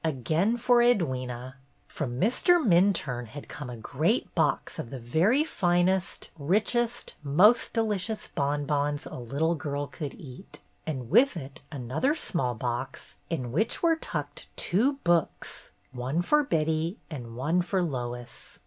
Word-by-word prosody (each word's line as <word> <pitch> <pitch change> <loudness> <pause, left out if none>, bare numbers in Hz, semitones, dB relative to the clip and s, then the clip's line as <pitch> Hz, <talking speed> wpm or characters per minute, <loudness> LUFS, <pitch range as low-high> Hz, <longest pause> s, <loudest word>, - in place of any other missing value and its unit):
Again 160 - +1
for 245 0 +4
Edwyna. 130 - +1 0.3
From 125 -4 -4
Mr. 300 - +4
Minturne 170 - +2
had 145 +6 -9
come 145 -4 -7
a 120 - -7
great 110 - 0
box - - 0
of - - -5
the 135 - -6
very 170 - +3
finest, 180 - 0
richest, 220 - 0
most 180 +12 +4
delicious 220 -1 -1
bonbons 145 +1 -1
a - - -9
little 140 +7 0
girl 145 -3 -3
could 145 0 -6
eat, 140 +4 -10 0.3
and 130 -6 -4
with 270 -6 +5
it 135 -3 -8
another 145 - 0
small 125 - -1
box, 120 +3 -4 0.2
in 130 -8 -3
which 215 - 0
were 330 -1 +5
tucked 320 - -5
two 235 +11 +2
books, 170 -2 0 0.2
one 130 +7 -2
for 300 +11 +4
Betty 160 - 0
and 120 -6 -7
one 155 +8 +1
for 185 +1 0
Lois. 120 -5 -5
155 Hz, 140 wpm, -28 LUFS, 130-200 Hz, 0.3 s, with